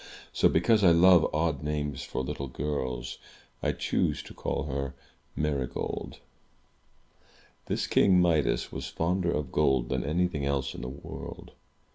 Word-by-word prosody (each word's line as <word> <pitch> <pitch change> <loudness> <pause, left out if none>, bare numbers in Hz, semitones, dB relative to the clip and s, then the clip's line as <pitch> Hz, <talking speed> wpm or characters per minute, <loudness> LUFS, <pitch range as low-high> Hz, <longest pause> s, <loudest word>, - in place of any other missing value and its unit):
So, - - +4
because 105 +6 +3
I 90 - +8
love 85 0 +6
odd 80 -2 0
names 75 -2 -2
for 65 - -4
little 70 +1 -4
girls, 65 -2 -3 0.4
I - - +1
choose - - -1
to - - -11
call - - -2
her 70 -2 -3 0.4
Marygold. 70 -4 -2 1.5
This - - -1
King 95 -2 +4
Midas 85 -5 +2
was 65 -1 -5
fonder 85 +5 0
of 75 -5 -2
gold 65 -5 +2
than 65 - -1
anything 80 0 0
else 70 -1 -1
in - - -8
the 60 - -4
world. 70 +2 -9
75 Hz, 140 wpm, -28 LUFS, 65-85 Hz, 1.5 s, I